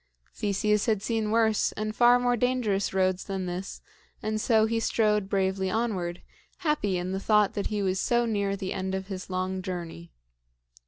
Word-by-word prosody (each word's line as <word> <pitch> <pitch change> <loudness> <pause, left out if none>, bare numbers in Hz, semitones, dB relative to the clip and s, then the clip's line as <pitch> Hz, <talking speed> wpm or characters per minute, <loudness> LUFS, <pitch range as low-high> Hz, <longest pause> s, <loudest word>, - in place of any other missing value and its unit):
Theseus 210 +1 0
had 215 -3 +1
seen 220 -2 -1
worse 220 -1 +2
and 215 0 -4
far 240 0 +6
more 245 0 +1
dangerous 235 -5 0
roads 185 -1 +1
than 190 -2 -3
this, 180 +2 -5 0.4
and 215 0 -1
so 220 -2 +4
he 225 +1 0
strode 210 -3 +1
bravely 190 -1 0
onward, 185 -5 -2 0.4
happy 210 - +1
in 180 +1 -3
the 190 - -2
thought 210 0 +3
that 200 - -2
he 210 -1 -2
was 190 0 0
so 240 +3 +2
near 200 -3 0
the 190 -1 -4
end 190 0 -2
of 190 +1 -5
his 185 -1 -6
long 185 0 -2
journey. 170 - -6
200 Hz, 175 wpm, -27 LUFS, 190-220 Hz, 0.4 s, far